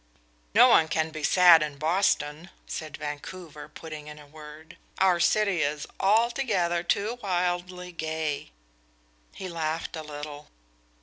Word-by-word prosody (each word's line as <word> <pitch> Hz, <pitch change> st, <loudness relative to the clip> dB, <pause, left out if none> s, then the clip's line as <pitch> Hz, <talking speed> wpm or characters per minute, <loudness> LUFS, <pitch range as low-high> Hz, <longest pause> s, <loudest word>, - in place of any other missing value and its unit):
"No -, -, +8 dB
one 160 Hz, -, +5 dB
can 160 Hz, 0 st, -1 dB
be 155 Hz, -1 st, -7 dB
sad 175 Hz, +1 st, +7 dB
in 150 Hz, -2 st, -3 dB
Boston," 160 Hz, 0 st, 0 dB, 0.2 s
said 155 Hz, -3 st, -6 dB
Vancouver, 150 Hz, +1 st, -7 dB
putting 155 Hz, -1 st, -9 dB
in 150 Hz, 0 st, -9 dB
a 150 Hz, -, -13 dB
word. 155 Hz, +2 st, -13 dB, 0.2 s
"Our 185 Hz, -2 st, +3 dB
city 200 Hz, 0 st, +2 dB
is 150 Hz, 0 st, -1 dB
altogether 205 Hz, -5 st, +2 dB
too 210 Hz, +7 st, -1 dB
wildly 180 Hz, -1 st, -2 dB
gay." 160 Hz, -, -3 dB, 0.9 s
He 190 Hz, -, -6 dB
laughed 165 Hz, -1 st, -3 dB
a 160 Hz, -, -5 dB
little. 150 Hz, -1 st, -8 dB
160 Hz, 130 wpm, -27 LUFS, 150-180 Hz, 0.9 s, No